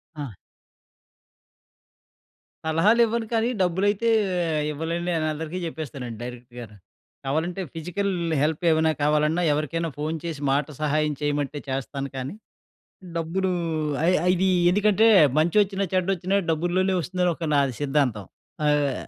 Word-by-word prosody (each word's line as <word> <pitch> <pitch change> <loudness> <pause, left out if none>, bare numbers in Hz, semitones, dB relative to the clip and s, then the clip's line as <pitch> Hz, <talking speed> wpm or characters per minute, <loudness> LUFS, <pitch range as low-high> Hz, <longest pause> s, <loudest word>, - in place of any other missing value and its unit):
ఆ! 145 -4 -5 2.4
సలహాలు 185 +9 +3
ఇవ్వను 225 0 -2
కానీ 225 +1 +2
డబ్బులైతే 200 +5 +1 0.6
ఇవ్వలేననని 165 +3 -3
నేను 160 -2 0
అందరికీ 160 +3 -5
జెప్పేస్తానండి 140 -8 -6
డైరెక్ట్‌గా‌ను. 120 -3 -9 0.5
కావాలంటే 160 +7 -1
ఫిజికల్ 180 +5 -2 0.3
హెల్ప్ 155 +2 0
ఏమైనా 160 0 +3
కావాలన్నా, 150 +3 +2
ఎవరికైనా 155 +3 -1
ఫోన్ 155 +2 -2
చేసి 165 -4 -4
మాట 140 +1 +1 0.2
సహాయం 150 0 +1
చేయమంటే 145 -1 -1
చేస్తాను 135 +1 -3
కానీ, 130 +5 -4 0.8
డబ్బులు 185 +3 -1 0.6
ఐ - - +6 0.2
ఐ - - +5
ఇది 190 +1 +1 0.2
ఎందుకంటే 210 +3 +3 0.3
మంచొచ్చినా, 195 +4 +2
చెడ్డొచ్చినా 185 +1 +1
డబ్బుల్లోనే 175 +4 +1
ఒస్తుందని 180 +1 0
ఒక 165 -2 -4
నాది 140 -3 +2
సిద్ధాంతం. 135 -7 0 0.4
ఆహ్, 145 -2 +2
160 Hz, 115 wpm, -24 LUFS, 145-185 Hz, 2.4 s, ఐ